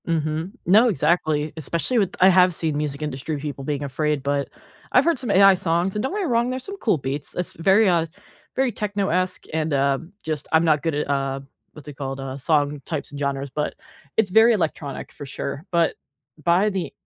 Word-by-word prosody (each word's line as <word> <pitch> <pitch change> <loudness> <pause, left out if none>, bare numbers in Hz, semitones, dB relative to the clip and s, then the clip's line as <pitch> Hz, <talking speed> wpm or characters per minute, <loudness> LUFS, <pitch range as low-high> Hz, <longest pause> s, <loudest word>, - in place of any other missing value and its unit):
Mhm. 160 +1 -1
No, 215 +7 +6
exactly. 155 -3 +1
Especially 170 - 0
with 190 -3 0
I 185 - +7
have 180 -1 +5
seen 155 -2 -1
music 150 -1 -3
industry 150 +1 -3
people 140 -1 -6
being 145 0 -2
afraid, 150 +1 -1
but 140 0 -1 0.4
I've 255 - +5
heard 335 -6 +2
some 250 - -3
AI 195 0 +7
songs, 180 +1 0
and 210 - 0
don't 265 - -1
get 420 - -1
me - - -1
wrong, 240 -3 +1
there's 255 0 -4
some 395 0 -7
cool 220 - +1
beats, 140 +1 -5
esp 180 - -3
very, 195 +5 +4
uh, 170 -3 +2 0.5
very 265 -1 +1
techno-esque 195 -4 -1
and, 160 -1 -1
um, 140 +4 0
just 155 -3 -3
I'm 160 +1 +4
not 155 -3 +3
good 165 -3 -1
at, 150 -1 -2
uh, 135 -1 -1 0.3
what's 150 -2 -13
it 150 - -7
called? 135 -1 -5
Uh, 135 -1 -5
song 145 0 0
types 155 0 -4
and 145 - -7
genres, 140 -1 -2
but 150 +3 -3 0.4
it's 220 -3 +3
very 225 +3 +6
electronic 155 -7 -3
for 145 - -9
sure, 140 +3 -5
but 170 -1 +2 0.5
by 180 +6 +3
the 190 -3 -3
160 Hz, 205 wpm, -23 LUFS, 145-190 Hz, 0.5 s, I